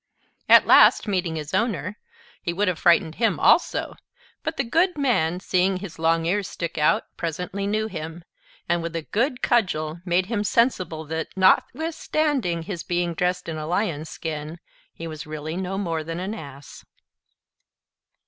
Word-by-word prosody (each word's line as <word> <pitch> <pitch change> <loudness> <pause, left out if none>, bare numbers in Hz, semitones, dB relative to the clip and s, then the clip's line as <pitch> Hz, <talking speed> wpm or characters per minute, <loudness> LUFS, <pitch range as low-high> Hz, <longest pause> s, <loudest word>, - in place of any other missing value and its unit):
At - - +8
last, - - +6
meeting 180 -5 -1
his 150 -2 -6
owner, 205 -4 -1 0.4
he 170 - -2
would 205 +4 0
have 180 -3 0
frightened 170 -2 +4
him 225 - +2
also; - - +3 0.5
but 320 -1 -4
the 275 - +1
good 335 +9 +1
man, 180 - +1
seeing 185 0 +1
his 180 -4 -9
long 165 0 +2
ears 195 +3 0
stick 170 -2 -5
out, 150 - +3
presently 180 +4 -3
knew 215 +1 0
him, 165 -4 -6 0.4
and 175 0 +1
with 170 0 -5
a 165 - -2
good 250 - -1
cudgel 170 -9 +1
made 180 0 +1
him 210 0 -2
sensible 185 -9 +1
that, 160 +1 -3
notwithstanding 280 - +1
his 175 -1 -5
being 175 -1 -1
dressed 180 +2 -1
in 160 -1 -4
a 155 0 -5
Lion's 170 -4 -1
skin, 155 0 -5 0.3
he 165 - -9
was 155 -2 -7
really 155 +1 -5
no 190 +1 -3
more 165 -5 -2
than 165 +2 -5
an 190 +4 -3
Ass. 140 -8 -10
175 Hz, 160 wpm, -24 LUFS, 160-205 Hz, 0.5 s, At